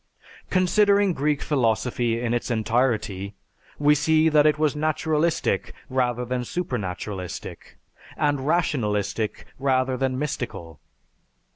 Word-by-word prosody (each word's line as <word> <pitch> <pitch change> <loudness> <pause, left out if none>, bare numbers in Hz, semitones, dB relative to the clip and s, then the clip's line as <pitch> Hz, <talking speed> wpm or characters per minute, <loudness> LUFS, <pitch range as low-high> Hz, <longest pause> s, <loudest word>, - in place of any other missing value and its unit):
Considering 200 +1 +3
Greek 150 0 0
philosophy 115 -3 0
in 120 -1 -1
its 120 - -2
entirety, 110 -4 0 0.4
we 145 0 +4
see 155 +2 +3
that 150 -1 +5
it 150 - +3
was 150 -1 +1
naturalistic 155 +1 0 0.2
rather 125 -1 0
than 125 0 -2
supernaturalistic, 100 - -5 0.4
and 145 -2 0
rationalistic 110 - 0
rather 130 -1 +1
than 130 0 -1
mystical. 120 - -5
130 Hz, 105 wpm, -24 LUFS, 115-150 Hz, 0.4 s, that